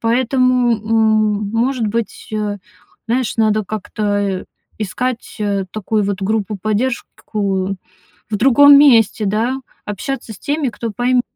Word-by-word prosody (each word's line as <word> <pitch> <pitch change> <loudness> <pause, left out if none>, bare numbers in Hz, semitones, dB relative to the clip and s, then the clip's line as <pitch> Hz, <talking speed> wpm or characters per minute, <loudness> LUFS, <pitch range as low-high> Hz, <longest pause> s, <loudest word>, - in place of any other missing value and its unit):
Поэтому, 250 +1 +2
м 215 -1 +1
может 235 0 0
быть, 230 +1 -4
э, 210 -1 -2 0.5
знаешь, 240 0 -1
надо 215 -1 +2
как-то, 215 +1 -6 0.2
э, 195 -2 -2 0.3
искать, 235 +4 -3
э, 200 -2 -1
такую 215 0 -1
вот 200 0 -2
группу 210 0 -1
поддержку 205 -3 -2 0.5
в 210 - 0
другом 280 +5 +7
месте, 230 -6 +4
да, 220 +6 0 0.3
общаться 220 +4 -5
с - - -12
теми, 290 -2 -1
кто 230 0 -5
пойм 245 +3 +1
220 Hz, 125 wpm, -18 LUFS, 205-245 Hz, 0.5 s, другом